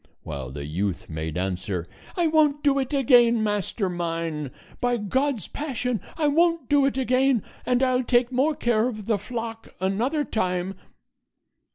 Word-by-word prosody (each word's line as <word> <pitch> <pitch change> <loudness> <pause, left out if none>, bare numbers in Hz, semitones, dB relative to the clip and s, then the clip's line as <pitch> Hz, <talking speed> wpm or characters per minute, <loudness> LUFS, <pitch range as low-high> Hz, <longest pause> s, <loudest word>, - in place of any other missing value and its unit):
while 70 -5 -5
the 70 +2 -6
youth 90 +4 -2
made 80 0 -4
answer, 90 -1 -2 0.3
"I 345 - +2
won't 305 -2 +3
do 280 -1 +3
it 265 0 -2
again, 240 -4 +5
master 205 -1 -1
mine; 165 -4 -3 0.3
by 245 0 +1
God's 250 - -1
passion, 250 -5 -3 0.2
I 310 -2 +2
won't 330 -1 +2
do 285 -2 +4
it 270 - -2
again, 255 -2 +2 0.2
and 250 +1 +2
I'll 255 -1 +2
take 240 0 +2
more 275 +5 +2
care 235 -2 +2
of 215 -5 -5
the 215 -2 +1
flock 225 +1 -6
another 225 +11 0
time." 185 -4 -1
235 Hz, 155 wpm, -25 LUFS, 180-270 Hz, 0.3 s, again